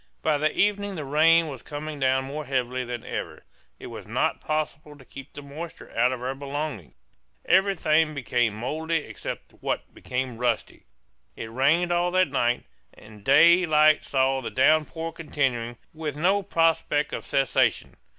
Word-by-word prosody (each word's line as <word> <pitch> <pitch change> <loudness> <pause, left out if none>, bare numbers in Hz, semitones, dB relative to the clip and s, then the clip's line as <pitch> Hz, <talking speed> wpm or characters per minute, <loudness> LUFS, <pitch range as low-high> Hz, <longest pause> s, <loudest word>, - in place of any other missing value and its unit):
By 150 -2 +2
the 155 +1 +1
evening 205 -1 +1
the 155 -4 -5
rain 160 +4 +4
was 135 -5 -7
coming 150 0 -6
down 130 0 +2
more 150 +3 -5
heavily 130 -1 -1
than 120 -1 -6
ever. - - -5 0.3
It - - -11
was - - -9
not - - -1
possible 155 -1 -3
to 135 - -16
keep 135 +1 -11
the 145 - -9
moisture 155 +4 -9
out 125 +2 +3
of 125 -1 -5
our 130 +1 -2
belongings; 140 - -5 0.5
everything 160 -5 +3
became 120 -5 0
mouldy 155 +8 -3
except - - -7
what - - -3
became 125 -2 -4
rusty. 120 -2 -2 0.5
It 110 - -7
rained 155 +8 +2
all 175 +1 +2
that 185 0 +2
night; 120 +1 0 0.3
and 105 -1 -15
day 170 - +6
light 155 0 +5
saw 135 0 +1
the 120 - -4
downpour 155 +4 +1
continuing 130 -7 -2 0.2
with 155 -3 -5
no 190 +6 +2
prospect 165 -5 +1
of - - -4
cessation. 135 -1 +1
145 Hz, 160 wpm, -25 LUFS, 130-160 Hz, 0.5 s, day